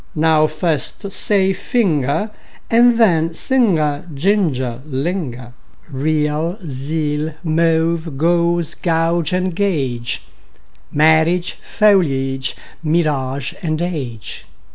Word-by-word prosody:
) - - -33
Now 155 0 +3
first 160 +5 -2
say: 195 -1 +1
finger, 190 - 0 0.4
And 235 +1 +5
then: 165 -7 +3
singer, 165 - +1
ginger, 140 - 0
linger. 135 -4 -4 0.4
Real, 150 +4 0
zeal; 150 +2 -2
mauve, 165 -1 +1
gauze 170 +1 +2
and 170 +1 0
gauge; 135 -12 -1 0.7
Marriage, 160 +3 +3
foliage, 135 -11 +1 0.3
mirage, 140 -5 0 0.2
age. 155 -9 -4
160 Hz, 80 wpm, -18 LUFS, 145-175 Hz, 0.7 s, And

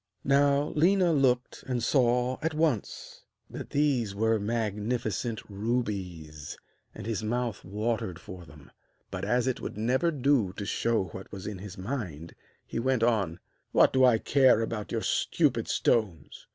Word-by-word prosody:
Now 140 +1 +3
Léna 175 +1 +4
looked 125 -3 +1
and 125 -3 -1
saw 125 0 +2
at 160 0 -1
once 155 -9 -1 0.3
that - - -7
these 130 -8 +1
were 110 +1 +2
magnificent 110 +1 -2
rubies, 95 -9 -4 0.4
and - - -8
his 110 -2 -2
mouth 120 +1 -2
watered 105 -2 -2
for 90 0 -10
them; 75 -2 -16 0.4
but - - -5
as 125 0 +1
it 130 -2 -1
would - - -6
never 130 +10 +1
do 135 - +1
to 100 0 -6
show 115 +1 +1
what 95 +4 -10
was 95 -2 -8
in 105 -3 -5
his 100 -1 -9
mind, 95 - -5 0.3
he - - -4
went 130 -1 +1
on: 100 -8 +1 0.3
'What - - +5
do 130 0 +4
I 125 -3 +6
care 130 -1 +4
about 110 -2 -4
your - - -1
stupid - - +1
stones? 95 -11 0
115 Hz, 150 wpm, -28 LUFS, 100-130 Hz, 0.4 s, I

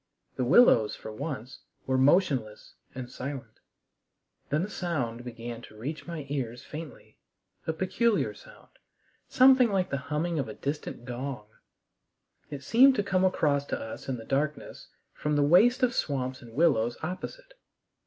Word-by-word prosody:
The 130 - -1
willows, 125 - +5
for 110 - -9
once, 130 0 -6 0.3
were 130 - 0
motionless 130 - +2 0.2
and 125 -1 -5
silent. 125 -3 -7 0.9
Then 150 +4 +1
a - - -2
sound 140 - -3
began 120 -1 -7
to 110 - -14
reach 145 +10 -6
my 165 -4 -5
ears 125 -3 -4
faintly, 155 -1 -10 0.5
a 160 - +1
peculiar 190 +6 +1
sound - - -16 0.6
something 260 -2 +6
like 190 -2 0
the 140 - 0
humming 160 +2 -1
of 135 - -2
a - - -7
distant 140 -4 -5
gong. 125 -2 -5 1.0
It 140 -2 -7
seemed 260 - +6
to 205 - +1
come 190 -2 +1
across 145 -6 +2
to - - -2
us 110 +4 -7
in 130 - -1
the 115 - -10
darkness 145 +2 -2 0.3
from 150 0 -1
the 145 - +3
waste 195 - +5
of 245 -1 +3
swamps 130 - -2
and 115 -2 -13
willows 120 -7 +2
opposite. - - -6
145 Hz, 155 wpm, -28 LUFS, 125-185 Hz, 1.0 s, something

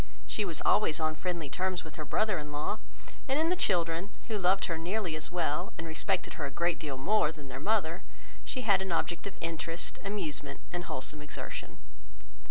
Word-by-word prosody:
She 160 - 0
was 170 -5 -1
always 200 -8 +5
on 155 0 +2
friendly 170 -1 -2
terms 185 +5 0
with 160 - -9
her 155 - -3
brother 210 +1 +2
in 150 0 -6
law; 150 +9 -1 0.5
and 265 +1 +3
in 325 +1 +4
the 360 - +4
children, 170 - +2 0.2
who 215 -2 +1
loved 190 +1 +4
her 165 - 0
nearly 180 0 0
as 155 +1 -2
well, 165 -4 0
and 165 - -4
respected 160 +1 0
her - - +1
a - - -1
great 170 +5 +1
deal 140 -4 -3
more 175 +3 +4
than 145 -4 -10
their 130 +1 -4
mother, 180 -1 +2 0.4
she 255 - -3
had 200 -5 +5
an 190 -1 -2
object 170 +3 0
of 200 - -7
interest, 165 +1 -3
amusement, 155 -8 -2
and 175 0 -2
wholesome 145 +2 -3
exertion. 150 - -6
170 Hz, 195 wpm, -32 LUFS, 155-195 Hz, 0.5 s, always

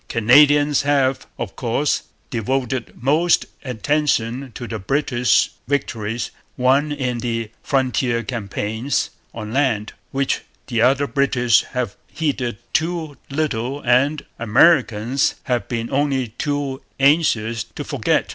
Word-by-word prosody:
Canadians 145 +5 +5
have, 135 -2 +1
of - - -5
course, 130 +4 0 0.3
devoted 125 0 -1
most 155 +6 +3 0.2
attention 130 0 0
to 120 - -6
the 110 -2 -4
British 125 +2 +2 0.2
victories 120 -5 -2 0.3
won 135 +4 +3
in 130 -4 -2
the 115 -2 -3
frontier 130 -3 0
campaigns 110 +3 -2 0.2
on 110 -1 -7
land, 120 -6 +1 0.2
which 135 0 0 0.2
the 115 -3 -1
other 135 +4 +4
British 130 -5 +3
have 125 -6 -1
heeded 130 -8 -2 0.2
too 160 -2 -1
little 140 -3 -1
and 140 +4 +2
Americans 125 0 +3
have 120 -5 -1
been 115 0 -3
only 135 -3 +1
too 140 +2 -3 0.2
anxious 120 -7 +3
to - - -7
forget. - - 0
130 Hz, 115 wpm, -21 LUFS, 115-145 Hz, 0.3 s, Canadians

